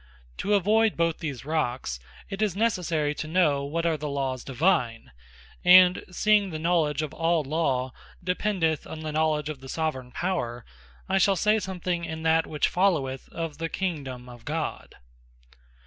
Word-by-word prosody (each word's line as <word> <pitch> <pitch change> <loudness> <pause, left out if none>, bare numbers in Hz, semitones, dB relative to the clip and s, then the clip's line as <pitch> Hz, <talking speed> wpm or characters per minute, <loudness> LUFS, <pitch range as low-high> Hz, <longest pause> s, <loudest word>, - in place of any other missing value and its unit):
To 205 0 +2
avoyd 220 +3 +2
both 165 -1 +1
these 140 -5 -5
Rocks, 125 - -2 0.3
it 195 +1 -5
is 205 -4 +1
necessary 175 -9 0
to 155 - -5
know 155 -4 +2
what 165 +4 -2
are 165 -2 +2
the 150 0 -4
Lawes 135 -3 -2
Divine. 125 - 0 0.5
And 180 0 +7
seeing 205 +2 +3
the 160 - -4
knowledge 155 -2 +1
of 150 - -5
all 165 -1 +1
Law, 135 -4 -1 0.3
dependeth 180 -3 0
on 155 - -7
the 155 -1 -4
knowledge 155 -1 +1
of 155 -3 -5
the 135 - -10
Soveraign 130 -6 -3
Power; 120 -11 -2 0.4
I 195 +1 +2
shall 195 +1 +4
say 210 +4 +3
something 180 -3 -3
in 160 -1 -5
that 160 0 +3
which 150 -2 +1
followeth, 155 -9 0
of 165 -3 -5
the 165 0 -2
KINGDOME 140 -10 -4
OF 120 -2 -12
GOD. 155 +3 -4
160 Hz, 165 wpm, -26 LUFS, 140-180 Hz, 0.5 s, And